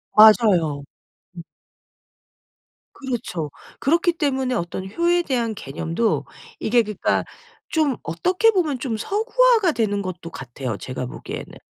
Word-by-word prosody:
맞아요. 200 -9 +6 0.5
음. 170 - -6 1.5
그렇죠. 235 - -4 0.3
그렇기 335 +4 +2
때문에 265 -5 0
어떤 190 -2 -3
효에 345 +6 +2
대한 235 -7 -1
개념도 165 - -1 0.3
이게 235 +1 +3
그러니까 210 -1 0 0.5
좀 300 -6 +1
어떻게 365 - +2
보면 330 -9 0
좀 235 -4 -2
서구화가 445 - +3
되는 210 -7 0
것도 185 -3 -6
같아요 125 -6 -6
제가 130 +2 -5
보기에는. - - -8
230 Hz, 265 characters per minute, -22 LUFS, -, 1.5 s, 맞아요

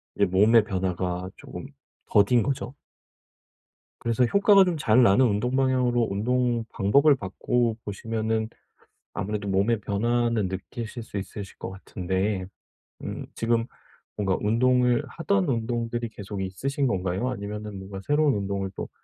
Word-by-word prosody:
이제 100 - +1
몸의 105 +5 +5
변화가 90 -2 -2
조금 - - -9 0.4
더딘 105 +4 +4
거죠. 135 -2 -3 1.3
그래서 115 +1 +2
효과가 200 - +5
좀 180 -2 -1
잘 125 -4 +4
나는 120 +3 +5
운동 120 +4 0
방향으로 125 -3 +2
운동 120 +3 0
방법을 140 +10 +4
바꿔 115 +2 -1
보시면은 110 +2 -2 0.7
아무래도 105 0 -3
몸의 100 +4 +2
변화는 115 +1 0
느끼실 110 +5 -6
수 105 - -7
있으실 100 0 -7
것 - - -5
같은데 95 0 -2 0.6
음 - - -5
지금 115 0 +1 0.5
뭔가 95 -3 +1
운동을 125 +2 +3
하던 185 +1 0
운동들이 115 -1 -2
계속 100 -2 -6
있으신 135 +9 -2
건가요? 95 +3 -1
아니면은 105 -2 -6
뭔가 95 0 -8
새로운 145 -1 +3
운동을 100 -1 -2
또 - - -5
110 Hz, 300 characters per minute, -26 LUFS, 100-125 Hz, 1.3 s, 몸의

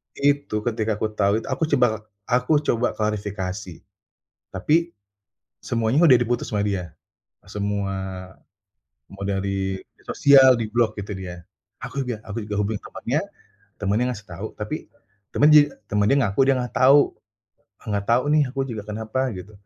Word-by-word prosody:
itu, 140 -6 0
ketika 110 -2 -1
aku 110 - -1
tahu 105 +1 +1
itu, - - -10
aku 135 +3 -1
coba 110 -5 +1 0.2
aku 125 +7 +2
coba 120 -3 0
klarifikasi. 105 -3 -4 0.7
Tapi, 150 - +1 0.9
semuanya 115 +6 +1
udah 130 -5 +8
diputus 120 0 -1
sama 105 -2 0
dia, 90 -5 -3 0.5
semua, 100 -1 -2 1.2
mau 100 0 -8
dari 95 -1 -2 0.2
sosial, 135 -2 +6
diblok 115 0 0
itu 100 +1 -6
dia. 90 -2 -8 0.4
Aku 140 - -4
juga 120 -3 -4
aku 105 +2 -5
juga 105 0 -4
hubungi 105 0 -2
temannya, - - -2 0.6
temannya 105 +4 +1
ngasih 105 -2 -11
tahu, 85 - -6
tapi - - -5 0.5
temenyi 150 0 +6 0.2
temennya 105 +5 +2
ngaku 100 +2 -3
dia - - +6
nggak 125 -2 -4
tahu, 135 +3 +5 0.7
"Nggak 100 -2 -2
tahu 120 +2 +3
nih, 155 - +5
aku 135 - -9
juga 110 -3 -5
kenapa?" 110 +4 -3
Gitu, 95 +3 -9
110 Hz, 140 wpm, -23 LUFS, 100-125 Hz, 1.2 s, udah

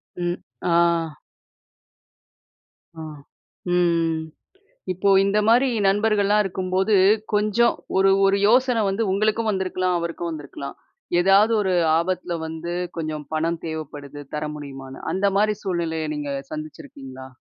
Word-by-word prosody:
ம், 175 0 -2 0.3
ஆ. - - +2 2.2
ஆ 160 - -8 0.7
ம்ம். 165 -2 +2 0.7
இப்போ 195 +3 +1
இந்த 200 +2 +1
மாரி 250 +4 +5 0.2
நண்பர்கள்லாம் 210 0 +2
இருக்கும்போது 190 +2 0 0.4
கொஞ்சம் 215 +3 +3 0.2
ஒரு 195 0 +4 0.2
ஒரு 195 0 +3
யோசனை 250 -1 +3
வந்து 195 +4 -1
உங்களுக்கும் 215 +2 +1
வந்திருக்கலாம், 185 -2 -1
அவருக்கும் 170 0 -4
வந்திருக்கலாம். 140 -2 -7 0.4
ஏதாவது 195 +5 +5
ஒரு 190 -1 0 0.3
ஆபத்தில 180 0 -2
வந்து 160 +2 -6 0.3
கொஞ்சம் 155 -2 -4
பணம் 165 +1 -1
தேவைப்படுது 145 -2 -7
தர 150 0 -2
முடியுமான்னு 135 -2 -9
அந்த 195 +2 +1
மாரி 215 0 +2
சூழ்நிலைய 165 -4 -2
நீங்க 145 -1 -4 0.2
சந்திச்சிருக்கீங்களா? 135 -3 -9
180 Hz, 110 wpm, -23 LUFS, 155-200 Hz, 2.2 s, மாரி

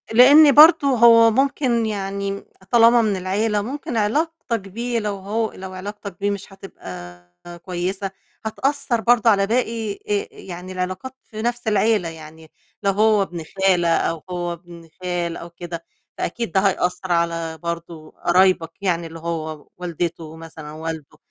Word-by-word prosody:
لإن 285 +6 +8
برضه 310 -1 +8
هو 230 -3 +6
ممكن 255 -2 +1
يعني 200 -1 -3
م 200 - -6 0.3
طالما 235 0 +6
من 215 -3 +1
العيلة، 205 +3 0
ممكن 250 +1 -5
علاقتك 255 +3 0
بيه 230 +5 -3
لو 210 -2 -2
هو 215 +3 -2
لو 185 0 -9
علاقتك 200 0 -8
بيه 205 +1 0
مش 200 0 -6
هتبقى 90 - -10 0.4
كويسة، 185 +2 -3 0.3
هتأثّر 265 +1 -1
برضه 235 -1 +4
على 195 -2 +3
باقي 230 -2 -1
آآ 415 - -3
يعني 185 - -9
العلاقات 185 +8 -4
في 215 -1 -8
نفْس 240 0 -2
العيلة 210 -3 +2
يعني، 160 0 -12 0.3
لو 200 - +3
هو 215 +1 +3
ابن 170 -3 -7
خالة 180 -3 +3
أو 165 -2 -2
هو 175 -1 -3
ابن 170 -1 -13 0.2
خال 175 -2 -2
أو 170 - -9
كده، 170 -1 -8 0.3
فأكيد 230 +2 -3
ده 190 - +3
هيأثّر 185 -1 0
على 165 -1 0
برضو 170 -2 -6
قرايبك 180 -2 +2
يعني 170 -4 0
اللي 165 0 -10
هو 160 -2 -5
والدته 170 -2 -4
مثلًا 160 -2 -10
والده 160 -1 -7
195 Hz, 150 wpm, -21 LUFS, 170-230 Hz, 0.4 s, لإن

